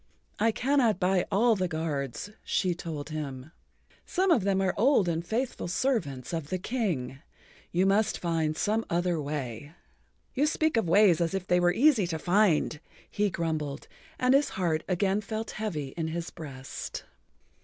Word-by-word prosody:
"I 225 Hz, +2 st, +3 dB
cannot 245 Hz, -5 st, +2 dB
buy 180 Hz, -1 st, +2 dB
all 225 Hz, +3 st, +4 dB
the 185 Hz, -2 st, 0 dB
guards," 160 Hz, -, -3 dB
she 185 Hz, -3 st, 0 dB
told 160 Hz, -3 st, -6 dB
him. 140 Hz, -2 st, -5 dB, 0.5 s
"Some 380 Hz, 0 st, +1 dB
of 245 Hz, -, +4 dB
them 195 Hz, -1 st, +2 dB
are 190 Hz, -1 st, +1 dB
old 225 Hz, -3 st, +3 dB
and 165 Hz, -1 st, -1 dB
faithful 230 Hz, +3 st, -2 dB
servants 175 Hz, -, -1 dB
of 160 Hz, -3 st, -3 dB
the 185 Hz, -, -1 dB
King. 175 Hz, -, -2 dB, 0.5 s
You 180 Hz, +2 st, +2 dB
must 205 Hz, +2 st, +2 dB
find 160 Hz, -3 st, -1 dB
some 220 Hz, +2 st, +1 dB
other 175 Hz, -1 st, 0 dB
way." 145 Hz, -1 st, -5 dB, 0.6 s
"You 285 Hz, +3 st, +2 dB
speak 315 Hz, -1 st, +1 dB
of 225 Hz, -7 st, +1 dB
ways 180 Hz, -2 st, +5 dB
as 170 Hz, +2 st, 0 dB
if 190 Hz, -2 st, -3 dB
they 180 Hz, -1 st, +3 dB
were 175 Hz, 0 st, +4 dB
easy 235 Hz, -, +4 dB
to 165 Hz, -2 st, -2 dB
find," 175 Hz, -3 st, +2 dB, 0.3 s
he 205 Hz, 0 st, +1 dB
grumbled, 155 Hz, -5 st, -3 dB, 0.3 s
and 255 Hz, +1 st, +3 dB
his 280 Hz, +2 st, +4 dB
heart 165 Hz, -4 st, 0 dB
again 195 Hz, +2 st, +1 dB
felt 220 Hz, +2 st, -4 dB
heavy 165 Hz, -11 st, -3 dB
in 160 Hz, +3 st, -4 dB
his 165 Hz, +1 st, -4 dB
breast. 135 Hz, -4 st, -7 dB
180 Hz, 165 wpm, -28 LUFS, 155-215 Hz, 0.6 s, ways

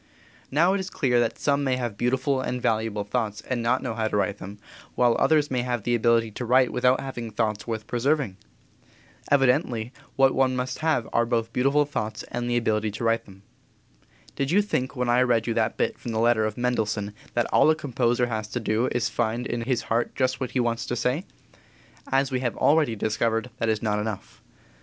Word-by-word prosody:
Now 170 Hz, +7 st, +3 dB
it 200 Hz, -, 0 dB
is 190 Hz, 0 st, -4 dB
clear 125 Hz, -8 st, +1 dB
that 115 Hz, -1 st, 0 dB
some 145 Hz, 0 st, +1 dB
may 130 Hz, -2 st, +1 dB
have 120 Hz, -4 st, -3 dB
beautiful 130 Hz, +4 st, 0 dB
and 125 Hz, -1 st, -3 dB
valuable 110 Hz, -3 st, 0 dB
thoughts 105 Hz, -1 st, -2 dB
and 125 Hz, 0 st, -3 dB
not 120 Hz, +3 st, +1 dB
know 125 Hz, -, -2 dB
how 110 Hz, 0 st, -1 dB
to 105 Hz, -, -1 dB
write 100 Hz, 0 st, -1 dB
them, 100 Hz, +2 st, -8 dB, 0.4 s
while 120 Hz, -2 st, +3 dB
others 150 Hz, -3 st, +3 dB
may 125 Hz, -1 st, +1 dB
have 120 Hz, -3 st, -2 dB
the 120 Hz, -, 0 dB
ability 115 Hz, -1 st, +2 dB
to 115 Hz, -, -6 dB
write 125 Hz, +1 st, +3 dB
without 125 Hz, +1 st, +3 dB
having 120 Hz, -4 st, -5 dB
thoughts 110 Hz, 0 st, -2 dB
worth 110 Hz, -2 st, -3 dB
preserving. 125 Hz, -3 st, 0 dB, 0.9 s
Evidently 125 Hz, -3 st, +2 dB, 0.2 s
what 135 Hz, -1 st, +4 dB
one 130 Hz, -1 st, +2 dB
must 125 Hz, 0 st, -3 dB
have 155 Hz, -7 st, +1 dB
are 120 Hz, -, +3 dB
both 115 Hz, -1 st, -1 dB
beautiful 140 Hz, +4 st, +3 dB
thoughts 110 Hz, -6 st, -4 dB
and 120 Hz, 0 st, -2 dB
ability 110 Hz, -3 st, +1 dB
to 105 Hz, +3 st, -6 dB
write 115 Hz, 0 st, +1 dB
them. 95 Hz, 0 st, -16 dB, 0.9 s
Did 135 Hz, -1 st, -1 dB
you 200 Hz, +5 st, +4 dB
think 135 Hz, -9 st, -2 dB
when 125 Hz, -1 st, -1 dB
I 120 Hz, +1 st, +4 dB
read 120 Hz, -3 st, +2 dB
you 115 Hz, -, -1 dB
that 110 Hz, 0 st, 0 dB
bit -, -, -1 dB
from 120 Hz, -, -5 dB
the 110 Hz, -, 0 dB
letter 115 Hz, -1 st, +3 dB
of 110 Hz, -1 st, -3 dB
Mendelssohn 110 Hz, -4 st, -1 dB, 0.2 s
that 120 Hz, -1 st, +2 dB
all -, -, +5 dB
a 155 Hz, -, +4 dB
composer 125 Hz, -4 st, 0 dB
has 110 Hz, -3 st, -3 dB
to 120 Hz, -, -3 dB
do 110 Hz, +2 st, 0 dB
is 120 Hz, -, 0 dB
to -, -, -3 dB
find 120 Hz, +1 st, -1 dB
in 120 Hz, -2 st, -3 dB
his 120 Hz, 0 st, -1 dB
heart 115 Hz, +1 st, -1 dB
just 130 Hz, 0 st, 0 dB
what 130 Hz, -, -3 dB
he -, -, +2 dB
wants 120 Hz, -1 st, -1 dB
to 120 Hz, -, -2 dB
say? 125 Hz, +8 st, -1 dB, 0.9 s
As 135 Hz, 0 st, +2 dB
we 130 Hz, -, 0 dB
have 125 Hz, -2 st, -2 dB
already 150 Hz, -6 st, +3 dB
discovered, 115 Hz, +2 st, -1 dB
that 115 Hz, -, 0 dB
is 110 Hz, 0 st, 0 dB
not 105 Hz, -1 st, 0 dB
enough. 105 Hz, -2 st, -6 dB
120 Hz, 215 wpm, -25 LUFS, 110-130 Hz, 0.9 s, all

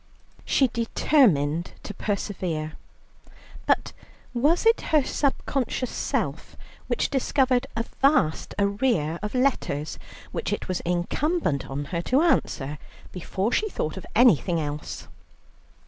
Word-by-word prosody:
She 270 Hz, -, +3 dB
determined 185 Hz, -, +2 dB
to 205 Hz, -, -6 dB
persevere, 180 Hz, -7 st, -3 dB, 0.9 s
but -, -, +2 dB, 0.4 s
was 295 Hz, -, +2 dB
it 455 Hz, +1 st, +5 dB
her 305 Hz, -3 st, +4 dB
subconscious 265 Hz, -2 st, -1 dB
self -, -, -2 dB, 0.3 s
which -, -, 0 dB
discovered 260 Hz, -2 st, +2 dB
a 230 Hz, -, 0 dB, 0.2 s
vast 270 Hz, -, +2 dB
arrear 200 Hz, -, +1 dB
of 210 Hz, +4 st, -4 dB
letters 245 Hz, -, 0 dB, 0.3 s
which -, -, -3 dB
it -, -, -3 dB
was 185 Hz, -1 st, -1 dB
incumbent 175 Hz, -, -1 dB
on 140 Hz, +2 st, -3 dB
her 170 Hz, -, 0 dB
to 260 Hz, -, +2 dB
answer 150 Hz, -, 0 dB, 0.3 s
before 190 Hz, +4 st, -2 dB
she 430 Hz, +9 st, +1 dB
thought 155 Hz, -, -3 dB
of 190 Hz, -, -8 dB
anything 185 Hz, -, +4 dB
else? 150 Hz, -1 st, -5 dB
205 Hz, 115 wpm, -25 LUFS, 160-265 Hz, 0.9 s, it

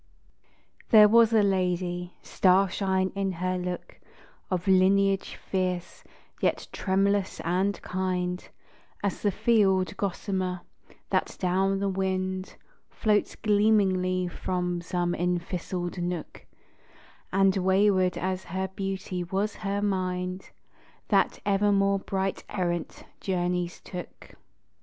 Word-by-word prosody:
THERE 215 Hz, -3 st, +9 dB
was 230 Hz, +1 st, +5 dB
a 220 Hz, -2 st, +4 dB
lady, 180 Hz, -2 st, -1 dB
starshine 190 Hz, 0 st, +2 dB
in 195 Hz, -1 st, -1 dB
her 185 Hz, +1 st, -1 dB
look, 180 Hz, 0 st, -5 dB, 0.5 s
Of 185 Hz, -1 st, -2 dB
lineage 195 Hz, +1 st, +3 dB
fierce, 185 Hz, -2 st, -3 dB, 0.4 s
yet -, -, 0 dB
tremulous 195 Hz, 0 st, 0 dB
and 185 Hz, +4 st, 0 dB
kind 180 Hz, -1 st, -2 dB, 0.5 s
As 200 Hz, -, -1 dB
the 205 Hz, -, +2 dB
field 195 Hz, -3 st, +2 dB
gossamer, 185 Hz, -2 st, -2 dB, 0.5 s
that -, -, 0 dB
down 190 Hz, +2 st, +1 dB
the 200 Hz, 0 st, -1 dB
wind 190 Hz, 0 st, -2 dB, 0.3 s
Floats 210 Hz, -2 st, +1 dB
gleamingly 195 Hz, -4 st, +2 dB
from 180 Hz, 0 st, -2 dB
some 175 Hz, 0 st, -1 dB
enthistled 175 Hz, 0 st, -2 dB
nook; 175 Hz, -2 st, -5 dB, 0.8 s
And 195 Hz, 0 st, +3 dB
wayward 190 Hz, -1 st, +3 dB
as 185 Hz, +1 st, -2 dB
her 190 Hz, +2 st, -3 dB
beauty 190 Hz, -2 st, -4 dB
was 195 Hz, +4 st, -1 dB
her 200 Hz, 0 st, -2 dB
mind 185 Hz, -1 st, -2 dB, 0.6 s
That -, -, +3 dB
evermore 200 Hz, 0 st, +3 dB
bright 195 Hz, 0 st, -2 dB
errant 175 Hz, -3 st, -3 dB, 0.2 s
journeys 180 Hz, -2 st, -1 dB
took. 180 Hz, -2 st, -9 dB
190 Hz, 105 wpm, -27 LUFS, 180-195 Hz, 0.8 s, THERE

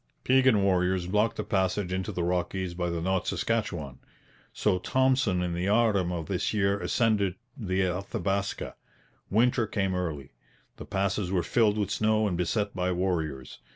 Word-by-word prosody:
Piegan 130 Hz, -5 st, +4 dB
warriors 90 Hz, -1 st, +2 dB
blocked 105 Hz, +4 st, +1 dB
the -, -, -2 dB
passage 95 Hz, -1 st, 0 dB
into 95 Hz, 0 st, -2 dB
the 90 Hz, -, -2 dB
Rockies 90 Hz, +1 st, -1 dB
by 90 Hz, 0 st, -2 dB
the 85 Hz, -1 st, -2 dB
North 95 Hz, 0 st, 0 dB
Saskatchewan; 85 Hz, -, -2 dB, 0.5 s
so 95 Hz, -4 st, +1 dB
Thompson 130 Hz, -6 st, +2 dB
in 90 Hz, -1 st, -2 dB
the 90 Hz, +2 st, -2 dB
autumn 105 Hz, -4 st, +2 dB
of 85 Hz, -3 st, -3 dB
this 110 Hz, -, -1 dB
year 100 Hz, -1 st, +2 dB
ascended 100 Hz, 0 st, +1 dB, 0.2 s
the 95 Hz, -8 st, -1 dB
Athabaska. 100 Hz, +2 st, -2 dB, 0.6 s
Winter 120 Hz, +2 st, +2 dB
came 95 Hz, -3 st, -1 dB
early. 80 Hz, -7 st, -3 dB, 0.5 s
The -, -, -8 dB
passes 95 Hz, -1 st, -1 dB
were 90 Hz, -3 st, +1 dB
filled 110 Hz, -3 st, +2 dB
with 105 Hz, -2 st, -1 dB
snow 110 Hz, 0 st, +2 dB
and 90 Hz, -, -1 dB
beset 100 Hz, +4 st, -1 dB
by 90 Hz, 0 st, 0 dB
warriors. 80 Hz, -7 st, -2 dB
95 Hz, 155 wpm, -28 LUFS, 90-105 Hz, 0.6 s, Piegan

